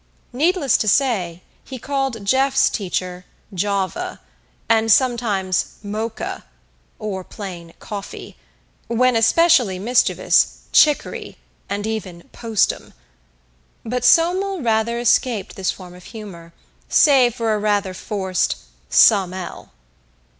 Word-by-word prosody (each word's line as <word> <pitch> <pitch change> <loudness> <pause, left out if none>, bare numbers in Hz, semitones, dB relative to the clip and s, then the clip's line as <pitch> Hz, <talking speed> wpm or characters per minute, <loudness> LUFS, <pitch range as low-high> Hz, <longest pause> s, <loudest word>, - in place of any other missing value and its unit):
Needless 310 +1 +2
to 215 - -2
say, 190 -9 +1 0.2
he 260 - -8
called 270 -5 -3
Jeff's 270 +4 +2
teacher 180 -2 -4 0.3
"Java," 200 - -2 0.5
and 225 0 +3
sometimes 215 -7 +1
"Mocha," 215 +2 -5 0.5
or 200 -3 -5
plain 175 -4 -9
"Coffee"; 200 -2 -8 0.5
when 235 0 +2
specially 265 - +4
mischievous, 235 +6 +2
"Chicory," 300 -2 +2 0.3
and 205 +1 -3
even 190 -6 -5
"Postum." 225 -3 -1 0.9
But 245 +2 -3
Somel 360 +4 +3
rather 225 0 0
escaped 235 -2 0
this 190 -1 -2
form 180 -2 -6
of 180 0 -15
humor, 190 -7 -10 0.4
save 260 -6 +4
for 230 -3 0
a 210 - -1
rather 205 -2 0
forced 190 -2 -2 0.3
"Some 190 - +4
'ell." 185 -2 -8
220 Hz, 105 wpm, -20 LUFS, 190-255 Hz, 0.9 s, specially